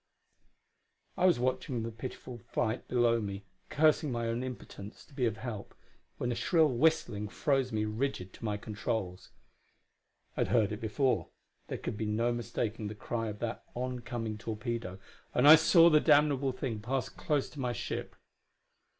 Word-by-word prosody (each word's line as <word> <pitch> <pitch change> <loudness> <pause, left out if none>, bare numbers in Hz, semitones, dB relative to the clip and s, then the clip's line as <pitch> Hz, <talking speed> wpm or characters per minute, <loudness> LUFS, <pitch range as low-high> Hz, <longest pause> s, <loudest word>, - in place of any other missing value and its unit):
I 185 -1 +4
was 175 - +4
watching 125 -1 -1
the 115 - -4
pitiful 120 +1 -7
flight 110 +1 -2
below 120 -1 +3
me, 100 -1 -5 0.2
cursing 155 -1 +3
my 120 -1 -2
own 115 +1 -1
impotence 120 -3 -8
to - - -21
be 125 -3 +1
of 110 -1 -2
help, 110 -3 -6 0.4
when 120 - -1
a - - +1
shrill 155 +6 +3
whistling 120 -6 +1
froze 135 +1 0
me 110 -1 0
rigid 105 -4 -3
to - - -13
my 105 -2 -1
controls. 105 -3 -4 1.1
I - - -6
had - - +2
heard 110 -4 +2
it 105 - -5
before 125 +4 0 0.4
there - - -4
could 105 - -5
be 110 - -2
no 115 +3 +1
mistaking 115 -2 -3
the 105 - -6
cry 115 +2 -3
of 105 -1 -5
that 115 -1 -3
oncoming 120 -3 -4
torpedo 110 -3 -4 0.4
and 125 +3 +5
I 150 - +13
saw 165 +1 +6
the 155 -2 +6
damnable 145 -3 +4
thing 125 -4 -4
pass 130 +5 -2
close 150 -3 -1
to 150 - -10
my 125 -2 0
ship. - - -4
120 Hz, 165 wpm, -31 LUFS, 110-135 Hz, 1.1 s, I